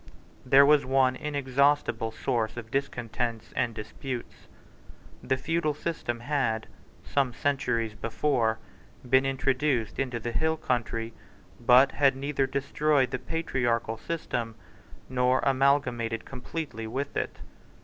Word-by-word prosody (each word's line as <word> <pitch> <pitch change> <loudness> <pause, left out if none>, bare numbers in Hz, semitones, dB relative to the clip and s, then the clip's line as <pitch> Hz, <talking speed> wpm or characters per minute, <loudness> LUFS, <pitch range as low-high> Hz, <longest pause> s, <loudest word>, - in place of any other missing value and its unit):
There 135 +2 +7
was 150 0 +5
one 130 -1 +3
inexhaustible 140 -3 +1
source 110 0 -1
of 115 -1 -7
discontents 120 -4 -3
and 115 -2 0
disputes. 120 +3 -7 0.7
The 130 - 0
feudal 155 +1 0
system 120 -7 -3
had, 120 -5 0 0.4
some 135 -3 +1
centuries 125 -6 0
before, 115 +1 0 0.5
been 130 +2 +4
introduced 135 -3 0
into 130 -3 -1
the 120 +1 -4
hill 160 +6 +1
country, 115 -4 -2 0.5
but 125 +3 +6
had 140 -2 +3
neither 135 0 -1
destroyed 140 0 +1
the 130 - -2
patriarchal 120 -9 -1
system 120 -9 -3 0.5
nor 125 0 +2
amalgamated 130 -4 +1
completely 130 -3 -6
with 135 +5 -4
it. - - -2
130 Hz, 115 wpm, -28 LUFS, 115-140 Hz, 0.7 s, There